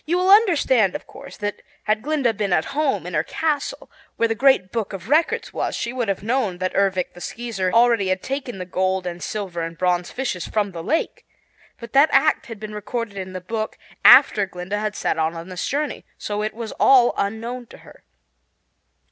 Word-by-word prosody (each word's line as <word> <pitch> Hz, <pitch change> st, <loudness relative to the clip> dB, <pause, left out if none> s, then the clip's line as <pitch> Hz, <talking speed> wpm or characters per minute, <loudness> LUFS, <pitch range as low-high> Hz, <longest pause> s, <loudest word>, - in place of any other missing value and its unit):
You 345 Hz, +3 st, 0 dB
will 370 Hz, +1 st, +3 dB
understand, 290 Hz, -, +4 dB
of -, -, -6 dB
course, 275 Hz, 0 st, -12 dB
that 205 Hz, 0 st, -4 dB, 0.2 s
had 215 Hz, 0 st, 0 dB
Glinda 280 Hz, -4 st, +1 dB
been 205 Hz, -2 st, -2 dB
at 160 Hz, -, +2 dB
home 295 Hz, -1 st, 0 dB
in -, -, -6 dB
her -, -, +2 dB
castle, 315 Hz, -, -3 dB, 0.2 s
where 230 Hz, -, +2 dB
the 225 Hz, -, 0 dB
Great 245 Hz, -6 st, +3 dB
Book 225 Hz, -4 st, -3 dB
of 195 Hz, +3 st, -8 dB
Records 335 Hz, +10 st, +1 dB
was, -, -, -2 dB
she 235 Hz, -, -3 dB
would 245 Hz, -3 st, -2 dB
have 195 Hz, 0 st, -2 dB
known 225 Hz, -5 st, 0 dB
that 185 Hz, +1 st, -2 dB
Ervic 195 Hz, -2 st, 0 dB
the 175 Hz, -, -13 dB
Skeezer 220 Hz, -6 st, -3 dB
already 230 Hz, -3 st, +4 dB
had 185 Hz, 0 st, -1 dB
taken 265 Hz, -5 st, -4 dB
the 185 Hz, -, -5 dB
gold 185 Hz, +1 st, -1 dB
and 175 Hz, 0 st, -5 dB
silver 190 Hz, -5 st, -4 dB
and 165 Hz, 0 st, -5 dB
bronze 180 Hz, -1 st, 0 dB
fishes 240 Hz, -10 st, -3 dB
from 205 Hz, -2 st, -1 dB
the 170 Hz, -2 st, -7 dB
lake. 310 Hz, -, -1 dB, 0.6 s
But 235 Hz, -1 st, -10 dB
that 280 Hz, +3 st, +6 dB
act 290 Hz, +3 st, +3 dB
had 225 Hz, -3 st, -8 dB
been 215 Hz, 0 st, -7 dB
recorded 210 Hz, +1 st, -4 dB
in 190 Hz, -1 st, -6 dB
the 185 Hz, -, -5 dB
Book 215 Hz, +4 st, -4 dB, 0.3 s
after 200 Hz, -2 st, +7 dB
Glinda 185 Hz, +3 st, -4 dB
had 210 Hz, 0 st, -3 dB
set -, -, -1 dB
out 160 Hz, +1 st, 0 dB
on 165 Hz, +2 st, -8 dB
this 180 Hz, -1 st, -4 dB
journey, 295 Hz, +1 st, -2 dB
so 210 Hz, 0 st, -3 dB
it 215 Hz, 0 st, -3 dB
was 230 Hz, -2 st, -6 dB
all 250 Hz, -3 st, +6 dB
unknown 230 Hz, +4 st, -3 dB
to -, -, -14 dB
her. -, -, -17 dB
215 Hz, 205 wpm, -22 LUFS, 185-255 Hz, 0.6 s, after